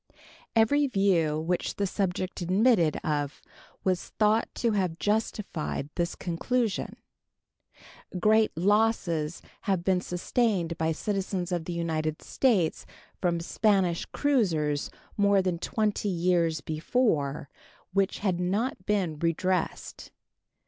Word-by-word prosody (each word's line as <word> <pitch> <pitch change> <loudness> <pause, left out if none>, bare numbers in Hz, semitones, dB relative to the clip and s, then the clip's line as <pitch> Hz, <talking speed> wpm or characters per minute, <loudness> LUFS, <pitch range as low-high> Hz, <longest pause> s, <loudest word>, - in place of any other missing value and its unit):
Every 280 +6 +4
view 180 - +2
which 170 +3 -1
the 200 - 0
subject 185 -1 -2
admitted 185 - +3
of 145 -2 -1 0.4
was 185 -2 0
thought 215 +1 +2
to 235 - +1
have 185 -5 0
justified 205 -8 -2
this 170 -1 -1
conclusion. 215 +6 -1 1.2
Great 215 +2 +4
losses 185 -5 +1 0.2
had 190 -4 0
been 185 0 +2
sustained 180 -1 0
by 160 0 0
citizens 190 0 -2
of 175 -2 -1
the 175 - -4
United 160 -2 -2
States 210 -12 +1 0.3
from 175 -2 +1
Spanish 185 -1 +1
cruisers 165 - 0 0.3
more 200 -1 +4
than 185 -3 0
20 210 +1 -1
years 170 -3 +1
before, 155 - 0 0.5
which 195 0 +1
had 180 -3 +1
not 190 +3 -1
been 185 -7 0
redressed. 170 +2 -1
185 Hz, 110 wpm, -28 LUFS, 165-210 Hz, 1.2 s, Every